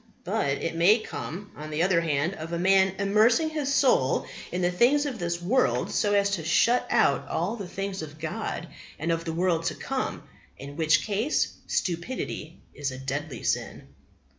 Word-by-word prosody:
But -, -, 0 dB, 0.2 s
it 165 Hz, -, -1 dB
may 180 Hz, +7 st, +5 dB
come, 205 Hz, -3 st, -7 dB
on 155 Hz, +1 st, -8 dB
the 155 Hz, +2 st, 0 dB
other 180 Hz, -2 st, +3 dB
hand, 160 Hz, +2 st, 0 dB
of 165 Hz, -2 st, -7 dB
a 170 Hz, -, -1 dB
man 190 Hz, +1 st, +4 dB
immersing 220 Hz, +10 st, +3 dB
his 295 Hz, -3 st, -1 dB
soul 250 Hz, -, +3 dB, 0.3 s
in 180 Hz, +1 st, -2 dB
the 175 Hz, -, +2 dB
things 260 Hz, +10 st, +3 dB
of 260 Hz, -6 st, -4 dB
this 170 Hz, 0 st, -2 dB
world 235 Hz, +10 st, +1 dB
so 205 Hz, -1 st, +1 dB
as 200 Hz, 0 st, +3 dB
to 180 Hz, -5 st, -1 dB
shut 235 Hz, +10 st, +3 dB
out -, -, +2 dB
all 180 Hz, +8 st, -1 dB
the 200 Hz, -5 st, -6 dB
things 195 Hz, 0 st, -4 dB
of 155 Hz, -1 st, -8 dB
God 170 Hz, +2 st, -4 dB, 0.3 s
and 160 Hz, +2 st, -1 dB
of 165 Hz, 0 st, -1 dB
the 165 Hz, -, -2 dB
world 170 Hz, -1 st, +1 dB
to -, -, -1 dB
come, -, -, -3 dB, 0.3 s
in 140 Hz, +1 st, -9 dB
which 160 Hz, -1 st, +3 dB
case 220 Hz, +8 st, +1 dB, 0.2 s
stupidity 170 Hz, -3 st, -3 dB, 0.2 s
is 145 Hz, -1 st, -3 dB
a 130 Hz, -, -7 dB
deadly 135 Hz, 0 st, -4 dB
sin." -, -, -2 dB
180 Hz, 185 wpm, -27 LUFS, 160-210 Hz, 0.3 s, may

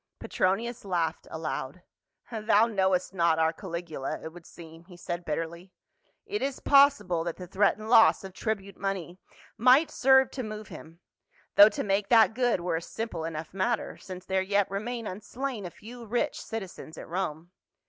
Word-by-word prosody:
Petronius 230 Hz, +6 st, -1 dB
laughed 170 Hz, -4 st, -2 dB
aloud, 160 Hz, 0 st, -5 dB, 0.3 s
" -, -, -31 dB
Thou 220 Hz, -1 st, +3 dB
knowest 190 Hz, -4 st, 0 dB
not 170 Hz, -3 st, +2 dB
our 160 Hz, 0 st, +2 dB
Cahgula, 170 Hz, -6 st, -5 dB
it 160 Hz, -, -7 dB
would 175 Hz, -1 st, -13 dB
seem," 165 Hz, 0 st, -13 dB
he 180 Hz, -1 st, -14 dB
said 175 Hz, 0 st, -5 dB
bitterly. 170 Hz, +3 st, -5 dB, 0.5 s
"It 415 Hz, 0 st, -3 dB
is 275 Hz, -1 st, -2 dB
possible 275 Hz, -, +4 dB
that 170 Hz, -1 st, -4 dB
the 180 Hz, -, -8 dB
threatened 200 Hz, +3 st, +1 dB
loss 225 Hz, -3 st, +6 dB
of 190 Hz, -1 st, -9 dB
tribute 200 Hz, -2 st, -4 dB
money 190 Hz, -2 st, -4 dB, 0.4 s
might 260 Hz, +7 st, +5 dB
serve 265 Hz, 0 st, +4 dB
to 265 Hz, -, -4 dB
move 215 Hz, -2 st, -7 dB
him 165 Hz, +2 st, -12 dB, 0.3 s
— -, -, -36 dB
though 205 Hz, +1 st, +10 dB
to 205 Hz, -, -4 dB
make 200 Hz, 0 st, 0 dB
that 225 Hz, -2 st, +6 dB
good 245 Hz, -5 st, +1 dB
were 170 Hz, -2 st, -1 dB
a -, -, -4 dB
simple 175 Hz, -4 st, -5 dB
enough 160 Hz, 0 st, -6 dB
matter, 220 Hz, +4 st, -1 dB
since 185 Hz, -1 st, -9 dB
there 190 Hz, 0 st, 0 dB
yet 200 Hz, 0 st, +1 dB
remain 230 Hz, +4 st, -4 dB
unslain 215 Hz, +2 st, -5 dB
a -, -, -7 dB
few 230 Hz, +6 st, -12 dB
rich 245 Hz, +7 st, -1 dB
citizens 190 Hz, -7 st, -7 dB
at -, -, -9 dB
Rome. 170 Hz, -1 st, -4 dB
195 Hz, 175 wpm, -28 LUFS, 170-225 Hz, 0.5 s, though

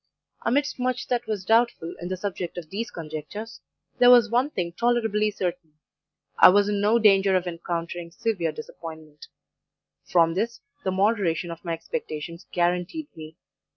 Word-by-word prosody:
Amidst 285 Hz, +4 st, 0 dB
much 250 Hz, -1 st, -1 dB
that 245 Hz, -1 st, -1 dB
was 205 Hz, -4 st, -3 dB
doubtful 225 Hz, -6 st, +2 dB
in 175 Hz, -, -4 dB
the 185 Hz, 0 st, -3 dB
subject 180 Hz, -2 st, -4 dB
of 165 Hz, -3 st, -7 dB
these 225 Hz, +4 st, -3 dB
conjectures, 165 Hz, +8 st, -7 dB, 0.4 s
there 245 Hz, -, +7 dB
was 240 Hz, -3 st, +7 dB
one 250 Hz, +4 st, +2 dB
thing 175 Hz, -, -3 dB
tolerably 225 Hz, -1 st, +1 dB
certain 180 Hz, -5 st, -4 dB, 0.7 s
I -, -, +10 dB
was 200 Hz, +2 st, +4 dB
in 205 Hz, -1 st, 0 dB
no 215 Hz, +3 st, +4 dB
danger 195 Hz, -3 st, +5 dB
of 185 Hz, -1 st, +1 dB
encountering 170 Hz, 0 st, -4 dB
severe 175 Hz, -2 st, -1 dB
disappointment; 155 Hz, -1 st, -10 dB, 0.8 s
from 165 Hz, -1 st, +3 dB
this, 230 Hz, +6 st, -2 dB, 0.2 s
the -, -, 0 dB
moderation 190 Hz, -4 st, +1 dB
of 165 Hz, -, -9 dB
my 170 Hz, -2 st, -2 dB
expectations 165 Hz, +1 st, -6 dB
guaranteed 180 Hz, -, -1 dB
me. 155 Hz, 0 st, -10 dB
185 Hz, 155 wpm, -25 LUFS, 170-225 Hz, 0.8 s, I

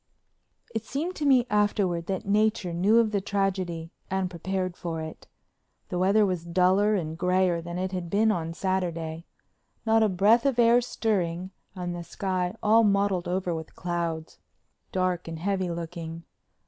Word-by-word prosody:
It 225 Hz, -1 st, -2 dB
seemed 315 Hz, +10 st, -3 dB
to 300 Hz, -, -2 dB
me 255 Hz, -3 st, +5 dB
afterward 200 Hz, -5 st, +1 dB
that 190 Hz, -1 st, -2 dB
Nature 205 Hz, -3 st, +1 dB
knew 195 Hz, +7 st, +3 dB
of 230 Hz, -2 st, +4 dB
the 200 Hz, -2 st, 0 dB
tragedy 185 Hz, -4 st, -2 dB, 0.2 s
and 190 Hz, -1 st, -1 dB
prepared 185 Hz, +1 st, -3 dB
for 165 Hz, -3 st, -4 dB
it. 160 Hz, 0 st, -8 dB, 0.6 s
The 180 Hz, -, -2 dB
weather 200 Hz, +3 st, +4 dB
was 180 Hz, -4 st, -1 dB
duller 185 Hz, +5 st, +3 dB
and 160 Hz, -4 st, -2 dB
grayer 180 Hz, 0 st, +2 dB
than 170 Hz, +1 st, -6 dB
it 185 Hz, +1 st, -2 dB
had 180 Hz, -2 st, -4 dB
been 215 Hz, +4 st, +3 dB
on 165 Hz, -4 st, -3 dB
Saturday, 170 Hz, -4 st, -2 dB, 0.6 s
not 225 Hz, 0 st, +4 dB
a 215 Hz, -, +4 dB
breath 210 Hz, +7 st, +4 dB
of 265 Hz, -3 st, 0 dB
air 240 Hz, +1 st, +5 dB
stirring 185 Hz, -7 st, -1 dB, 0.2 s
and 175 Hz, -1 st, -4 dB
the 175 Hz, -, -5 dB
sky 180 Hz, +2 st, -2 dB
all 225 Hz, +2 st, +5 dB
mottled 200 Hz, -3 st, +2 dB
over 180 Hz, 0 st, -1 dB
with 160 Hz, -1 st, -7 dB
clouds, 170 Hz, -2 st, -3 dB, 0.5 s
dark 185 Hz, -2 st, 0 dB
and 165 Hz, -1 st, -5 dB
heavy 190 Hz, +1 st, -1 dB
looking. 165 Hz, -1 st, -6 dB
185 Hz, 160 wpm, -27 LUFS, 170-205 Hz, 0.6 s, me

